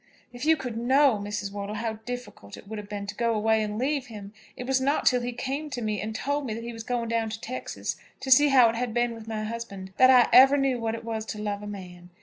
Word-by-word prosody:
"If 245 +3 -6
you 320 0 +5
could 245 -5 -5
know, 260 -1 +4
Mrs. 205 -1 -4
Wortle, 205 +1 -5
how 225 +1 -2
difficult 245 - -7
it - - -14
would 215 0 -6
have 205 -1 -10
been 205 -1 -5
to 200 - -5
go 235 -1 0
away 220 +1 +2
and 210 0 -3
leave 270 +1 -1
him! 210 -3 -10 0.2
It - - -5
was 265 0 +1
not 280 +3 +1
till 250 -1 +4
he 245 +1 -3
came 275 +5 -4
to 255 -3 -4
me 215 -2 -1
and 220 +1 -5
told 285 +3 -2
me 215 - -3
that 230 - -6
he 235 0 -6
was 225 - -7
going 235 0 -2
down 230 -1 0
to 220 +1 -6
Texas, 255 +3 -5 0.2
to 265 - -4
see 290 +3 +8
how 260 -4 +6
it 225 - -3
had 240 -1 -3
been 240 0 +1
with 225 -1 -11
my 220 -1 -3
husband, 215 -4 -6
that 255 - +7
I 250 -2 +7
ever 270 +2 +8
knew 270 -3 +1
what 225 -1 -2
it 230 0 -9
was 225 -1 -3
to 215 - -5
love 205 -1 -3
a 210 - -7
man. 180 -3 -9
230 Hz, 275 wpm, -26 LUFS, 210-255 Hz, 0.2 s, see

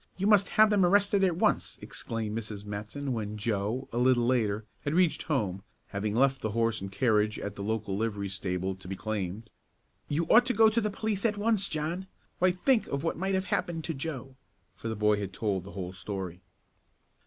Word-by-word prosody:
You 190 - -1
must 205 -2 +5
have 215 0 +7
them 205 -2 +4
arrested 200 +2 +4
at 180 -3 +3
once!" - - +1
exclaimed 110 -2 -4
Mrs. 105 -2 -5
Matson 105 +7 -4
when 105 -2 -3
Joe, 105 +4 -1
a 120 - 0
little 125 -1 +4
later, 110 -4 +1
had 145 +2 -2
reached 180 -3 +3
home, 105 - -1 0.3
having 105 +1 -2
left 135 +2 +3
the 110 - -1
horse 115 -2 +1
and 95 0 -5
carriage 105 -1 +2
at 100 0 -5
the 100 - -7
local 105 -1 -2
livery 105 -1 -1
stable 95 -1 -2
to 95 - -12
be 95 - -4
claimed. 105 +1 -4 0.6
"You 155 +3 0
ought 245 +5 +6
to 250 - +1
go 220 +1 +7
to 225 +2 +1
the 210 - 0
police 205 -1 -2
at 215 -3 +1
once, 205 -2 +2
John! 165 +5 -3 0.3
Why 185 - +5
think 220 +7 +2
of 140 +1 -3
what 165 - 0
might 190 +2 -1
have 190 0 0
happened 165 -2 -1
to 165 - -2
Joe," 135 -2 -5 0.4
for - - -7
the 110 - -2
boy 105 0 +2
had 100 -2 -4
told 95 -4 -1
the 100 - -10
whole 90 -2 -5
story. 95 -2 -5
115 Hz, 205 wpm, -29 LUFS, -, 0.6 s, have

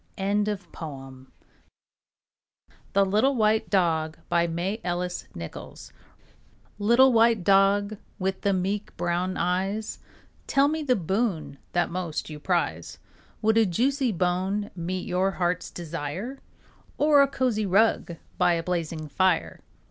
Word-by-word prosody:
ANONYMOUS. 170 -10 -3 1.7
THE 200 0 +4
LITTLE 215 +8 +2
WHITE 220 -1 +2
DOG 160 -5 +1 2.6
Little 235 +6 +5
white 230 0 +6
dog 200 +2 +3 0.2
with 190 0 -2
the 200 - +2
meek 195 +2 -2
brown 175 +2 -1
eyes, 195 +4 -1 0.5
Tell 275 +1 +4
me 315 +2 -1
the 265 -4 +2
boon 175 - -2
that 175 -1 +1
most 170 -3 -4
you 150 - -7
prize. 150 - -1 0.5
Would 220 +1 +4
a 225 - +5
juicy 260 - +1
bone 185 +3 -1
meet 180 +1 -3
your 185 +2 +1
heart's 180 -1 -1
desire? 170 - -5 0.6
Or 295 -1 +5
a 280 - +5
cozy 250 -6 0
rug 195 -3 +2 0.2
by 175 - +4
a 165 -1 -1
blazing 165 -3 -3
fire? 185 +4 +1
190 Hz, 110 wpm, -26 LUFS, 175-215 Hz, 2.6 s, white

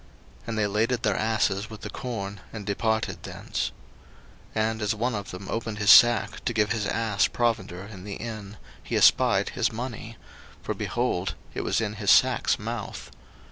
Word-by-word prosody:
01:042:026 - - -24
And 115 -1 -3
they 105 - +2
laded 110 +4 0
their 105 -4 +2
asses 110 -1 0
with 110 -2 -10
the 105 - -6
corn, 100 -5 -5
and 105 -3 -7
departed 110 +2 -1
thence. - - -4 0.8
01:042:027 110 0 +2
And 110 0 -6
as 105 +2 0
one 120 +3 -1
of 100 -2 -4
them 90 +1 -8
opened 115 0 -3
his 105 -1 +5
sack 120 -1 +6
to 120 - -1
give 105 -2 +1
his 110 -3 0
ass 110 -3 +1
provender 115 -6 -1
in 100 -3 -10
the 100 0 -6
inn, 110 -3 -7 0.2
he - - -4
espied - - +4
his - - 0
money; 115 -1 -6 0.5
for, - - -2
behold, 110 -7 -1 0.2
it - - -3
was - - 0
in 105 -2 -2
his 100 - 0
sack's - - +4
mouth. - - -6
110 Hz, 180 wpm, -26 LUFS, 100-115 Hz, 0.8 s, sack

